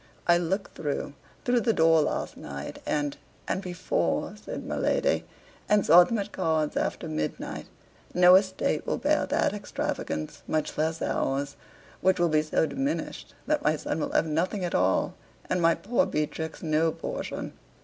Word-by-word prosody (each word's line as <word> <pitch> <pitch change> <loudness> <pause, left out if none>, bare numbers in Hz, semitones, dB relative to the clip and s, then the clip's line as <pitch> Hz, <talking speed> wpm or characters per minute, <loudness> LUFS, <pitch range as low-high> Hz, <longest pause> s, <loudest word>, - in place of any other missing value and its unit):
I 175 0 +5
looked 190 +4 -2
through 145 -1 -3 0.3
through 245 -1 +3
the 230 -2 +2
door 160 -2 +5
last - - -2
night, 70 +1 -7
and 145 -1 0 0.3
and 190 - -1
before," 185 -1 -1
said - - -7
my - - -3
lady, - - +1 0.4
"and 210 -1 +4
saw 175 +3 +9
them 225 +6 -1
at 205 0 -3
cards 160 -4 0
after - - -1
midnight; 75 0 -4 0.4
no 180 0 +7
estate 190 0 +2
will - - 0
bear - - +1
that - - +1
extravagance, 265 - -4
much 155 -1 -1
less 160 +1 -1
ours, 140 +1 -1 0.5
which 185 0 +3
will 175 -1 +3
be 155 -1 +3
so 155 +1 +1
diminished 270 - -3
that 305 - +1
my 150 +1 +2
son 155 - -3
will - - -2
have - - +3
nothing 180 +5 -1
at 175 - -3
all, 95 +1 +2 0.3
and 180 - 0
my 165 0 +5
poor 235 +4 +1
Beatrix 155 +2 -3
no 160 0 +2
portion!" - - -5
165 Hz, 165 wpm, -27 LUFS, 155-195 Hz, 0.5 s, saw